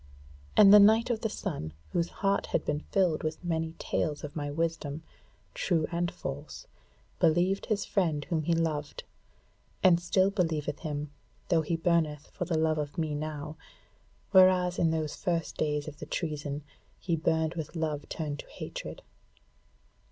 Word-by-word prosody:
And 200 -1 +9
the 210 - +11
Knight 220 +4 +6
of 225 -2 -1
the 225 - 0
Sun, 145 - -4 0.2
whose 170 0 0 0.2
heart 195 0 +2
had - - -1
been 150 0 0
filled 180 -5 +2
with 155 +2 -4
many 165 -1 -2
tales 150 -2 -2
of 150 - -7
my 145 -2 -3
wisdom, 160 -1 -2 0.5
true 165 -4 +1
and 175 0 0
false, 70 - -7 0.5
believed 175 +4 +2
his 210 -3 0
friend 160 -7 0
whom 165 -2 0
he 170 +2 +1
loved, 155 -3 -2 0.8
and 175 -2 +6
still 185 +2 +2
believeth 160 -6 -1
him, 150 -2 -4 0.4
though 165 -3 +4
he 160 +2 -1
burneth 165 -3 0
for 180 - -3
the 165 -2 0
love 155 -1 +2
of 145 -1 -4
me 160 -2 -1
now; 150 0 -5 0.7
whereas 185 -2 +5
in 165 - +3
those 160 -2 -1
first 170 -3 -2
days 150 -1 -1
of 150 -1 -8
the 150 - -7
treason, 150 -3 -3 0.4
he 170 -2 0
burned 160 0 +1
with 160 0 -6
love 155 -3 -2
turned 150 -3 -4
to - - -8
hatred. - - -7
160 Hz, 160 wpm, -29 LUFS, 150-175 Hz, 0.8 s, the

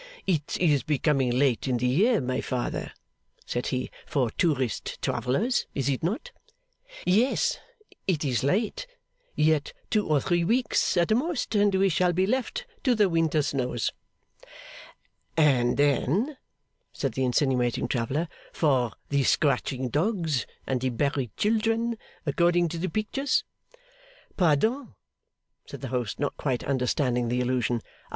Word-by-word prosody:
'It 160 -6 0
is 150 -6 +3
becoming 145 -3 +1
late 125 0 +1
in 125 -2 +1
the 125 - -1
year, 200 - +3
my 130 +1 -1
Father,' 125 -2 -3 0.5
said 120 - -2
he, 130 0 -2 0.2
'for 125 -6 0
tourist 135 - -1
travellers, 210 - 0
is 135 -1 0
it 135 - -1
not?' 220 - -2 0.7
'Yes, 250 - +2 0.5
it 160 -5 +1
is 130 -3 0
late. 220 - 0 0.5
Yet 150 -1 +2 0.2
two 210 -2 +2
or 150 -2 +3
three 175 +3 +1
weeks, 235 +1 +1
at 175 +5 +3
most, 290 -1 -1
and 205 -2 +3
we 195 +1 +4
shall 180 0 +2
be 185 +2 +2
left 260 - -1 0.2
to 250 -2 +3
the 210 -3 +3
winter 165 -3 +2
snows.' 125 -4 -1 1.5
'And 130 -6 +3
then,' 145 - +2 0.6
said 135 - -2
the 130 - -2
insinuating 125 -2 +1
traveller, 130 +7 -1 0.2
'for 130 -7 +1 0.2
the 140 -1 +2
scratching 130 -2 +1
dogs 160 - 0 0.2
and 130 -2 -1
the 130 - +1
buried 130 -2 -2
children, 225 +2 +1 0.3
according 170 +3 +2
to 165 +1 -5
the 185 +2 -1
pictures!' 240 - 0 0.9
'Pardon,' 215 - +1 0.7
said - - -9
the - - -5
host, 125 -4 -2
not 145 - -1
quite 130 -4 -1
understanding 125 -2 0
the 125 +1 0
allusion. 125 -1 0
150 Hz, 135 wpm, -27 LUFS, 130-195 Hz, 1.5 s, we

